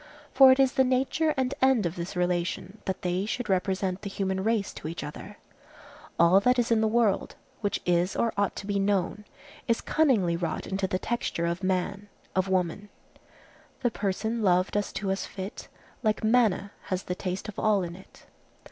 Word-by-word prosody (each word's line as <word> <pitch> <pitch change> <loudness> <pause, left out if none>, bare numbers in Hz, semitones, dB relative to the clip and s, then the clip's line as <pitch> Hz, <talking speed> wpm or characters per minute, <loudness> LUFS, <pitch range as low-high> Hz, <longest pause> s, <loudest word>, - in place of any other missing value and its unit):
For 265 -1 +8
it 260 - +3
is 265 -1 +5
the 265 - +4
nature 265 +5 +1
and 260 0 0
end 260 -6 +4
of 170 0 -2
this 175 +1 -5
relation, 180 +3 -1
that 190 - -3
they 180 +3 -1
should 240 0 -3
represent 190 0 0
the 200 - -5
human 190 -1 -2
race 220 -2 0
to - - -7
each 165 +2 -5
other. 150 - -8 0.8
All 170 +3 +6
that 250 +5 +3
is 240 -1 +1
in 225 -1 +4
the 220 - +3
world, 220 -3 +1 0.2
which 205 -2 -1
is 175 +1 +1
or 230 -1 +1
ought 200 -1 0
to - - -6
be 200 0 0
known, 200 +1 0 0.4
is 230 - +2
cunningly 230 - +2
wrought 170 -1 -3
into 190 0 -1
the 185 - -1
texture 205 -5 -2
of 170 +2 -2
man, 195 +2 -1 0.3
of 185 0 +1
woman:— 190 +2 -1 0.9
"The 245 -2 +1
person 220 +3 -2
love 185 -2 +3
does 205 0 -1
to 195 -1 -2
us 195 - -2
fit, 195 +2 -7 0.3
Like 215 -2 0
manna, 215 -4 +2
has 185 -1 -2
the 180 - -3
taste 185 +2 -4
of 215 - -6
all 210 -3 +2
in 170 -1 -6
it." 190 - -16
195 Hz, 190 wpm, -27 LUFS, 185-225 Hz, 0.9 s, For